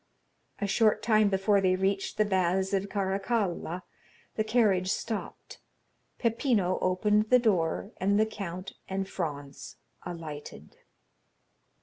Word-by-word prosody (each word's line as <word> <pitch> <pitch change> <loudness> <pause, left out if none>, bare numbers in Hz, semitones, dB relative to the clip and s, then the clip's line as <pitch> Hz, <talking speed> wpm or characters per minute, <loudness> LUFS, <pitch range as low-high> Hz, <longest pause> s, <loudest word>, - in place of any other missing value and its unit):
A 205 - -2
short 215 +2 +2
time 215 -2 +4
before 195 +1 +2
they 185 -1 +3
reached 195 +1 -1
the 215 - +3
Baths 190 0 +1
of 195 0 0
Caracalla 195 -3 -1 0.5
the 215 - 0
carriage 215 -5 +2
stopped, 220 0 -5 0.6
Peppino 230 -6 +1
opened 210 +4 +2
the 250 - +7
door, 195 -4 0
and 200 +3 +2
the 220 - +4
count 195 -3 -6 0.2
and 195 0 -2
Franz 145 -7 -5 0.3
alighted. 160 -4 -8
195 Hz, 115 wpm, -29 LUFS, 185-215 Hz, 0.6 s, the